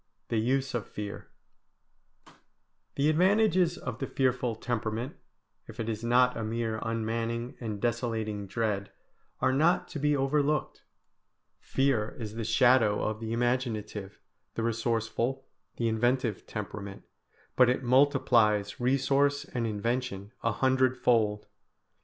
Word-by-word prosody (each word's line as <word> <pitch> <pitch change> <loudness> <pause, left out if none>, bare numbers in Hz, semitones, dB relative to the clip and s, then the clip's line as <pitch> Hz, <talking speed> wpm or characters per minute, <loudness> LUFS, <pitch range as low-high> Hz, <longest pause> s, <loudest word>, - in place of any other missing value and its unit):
V - - +1
THE - - 0
USE 130 +2 0
OF 120 -5 -3
FEAR 105 -1 -7 1.7
The 140 +1 +2
advantages 180 +1 +3
of - - -6
the 135 - -3
fearful 125 -3 0
temperament, 115 +2 -3 0.5
if 115 +2 -12
it 115 - -2
is 110 0 -3
not 125 +1 +4
a 115 - -3
mere 110 0 -2
unmanning 115 +2 -2
and 110 -4 -4
desolating 110 -3 -2
dread, 100 -1 -2 0.5
are 130 - +3
not 160 +6 +3
to 155 - -5
be 150 0 +2
overlooked. 145 +2 0 0.8
Fear 135 -6 0
is 110 -3 -6
the 115 0 -4
shadow 115 -1 +4
of 110 0 -2
the 110 0 -5
imaginative, 115 -4 -2 0.4
the 115 - -2
resourceful, 115 +3 -1 0.3
the 115 - 0
inventive 120 -1 0
temperament, 100 -1 -6 0.5
but 125 -1 +6
it 125 - 0
multiplies 120 -6 +3
resource 140 +3 +2
and 120 -4 -3
invention 110 -1 -2
a 115 - +1
hundredfold. 125 -3 +2
120 Hz, 125 wpm, -29 LUFS, 110-130 Hz, 1.7 s, but